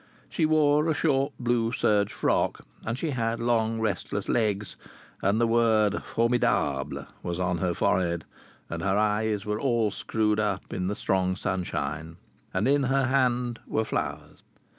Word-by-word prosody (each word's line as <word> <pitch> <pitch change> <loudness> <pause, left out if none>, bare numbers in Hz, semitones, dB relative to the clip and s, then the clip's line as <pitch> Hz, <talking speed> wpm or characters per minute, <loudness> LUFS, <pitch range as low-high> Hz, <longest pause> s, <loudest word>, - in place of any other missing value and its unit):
She 160 - +1
wore 150 0 +3
a 155 - +1
short 140 -2 +1
blue 120 -2 +1
serge 105 -5 +2
frock, - - 0 0.2
and 115 +2 -3
she 160 +2 -2
had 115 -3 -1
long 115 -1 +1
restless 100 -2 -2
legs, 105 -3 0 0.5
and 100 +3 +2
the 120 - +4
word 110 -3 +3
Formidable 80 - 0 0.2
was 85 0 -4
on 90 -1 0
her 90 0 0
forehead, 85 -3 +1 0.4
and 85 0 -5
her 95 +1 +1
eyes 105 -1 +1
were 105 0 -2
all 120 -5 +1
screwed 105 0 0
up 105 -3 -2
in 90 -1 -2
the 100 - -1
strong 95 -2 0
sunshine. 80 -4 -3 0.3
And 95 +5 0
in 140 0 +3
her 135 +1 +2
hand 125 -3 +1
were 110 - 0
flowers. - - -4
110 Hz, 155 wpm, -27 LUFS, 95-120 Hz, 0.5 s, the